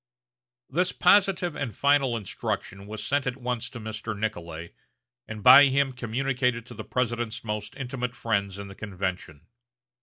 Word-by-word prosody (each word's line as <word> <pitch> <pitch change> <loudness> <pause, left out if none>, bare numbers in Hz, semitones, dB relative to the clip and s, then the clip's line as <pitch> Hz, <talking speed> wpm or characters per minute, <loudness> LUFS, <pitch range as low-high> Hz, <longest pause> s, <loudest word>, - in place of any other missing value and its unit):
This 180 +5 +1
positive 190 -5 +3
and 120 -8 -4
final 140 -4 +3
instruction 100 -1 -4
was 105 0 -6
sent 140 -1 0
at 125 +1 -2
once 125 -3 -3
to 120 - -9
Mr. 110 0 -5
Nicolay, 85 -6 -4 0.5
and 110 -2 -7
by 135 +4 +10
him 135 0 +2
communicated 125 0 -1
to 125 - -11
the 110 -1 -7
President's 120 -1 -2
most 105 -2 -4
intimate 125 -2 -4
friends 100 -5 -1
in 100 0 -7
the 95 - -10
convention. 95 -6 -5
115 Hz, 150 wpm, -26 LUFS, 105-130 Hz, 0.5 s, by